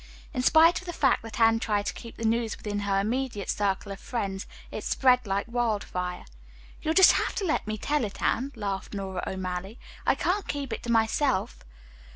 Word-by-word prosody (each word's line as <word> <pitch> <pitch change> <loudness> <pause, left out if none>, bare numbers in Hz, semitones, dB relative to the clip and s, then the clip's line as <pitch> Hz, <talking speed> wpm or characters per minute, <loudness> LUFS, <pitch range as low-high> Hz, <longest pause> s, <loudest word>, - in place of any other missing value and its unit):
In 255 - -1
spite 320 +6 +6
of 370 - -14
the 345 - -4
fact 270 -5 +2
that 225 -1 -8
Anne 225 0 +5
tried 205 -2 0
to - - -2
keep 230 - -10
the 230 - -3
news 225 0 0
within 205 -1 -3
her 200 -1 +1
immediate 225 -1 -1
circle 200 0 -1
of 195 - -7
friends, 195 -5 -4 0.2
it - - -5
spread 250 -3 +3
like 195 +1 0
wildfire. 210 -7 -2 0.6
"You'll 315 +1 0
just 380 -1 +9
have - - 0
to 405 - -1
let 315 -9 0
me 215 0 -2
tell 295 +5 0
it, 205 -2 -5
Anne," 265 +4 0
laughed 200 -2 -4
Nora 190 -2 -4
O'Malley. 190 +3 -4 0.3
"I - - +3
can't 390 +2 0
keep 280 -4 -3
it - - -4
to 235 - -3
myself." 225 -1 +1
225 Hz, 200 wpm, -27 LUFS, 200-255 Hz, 0.6 s, just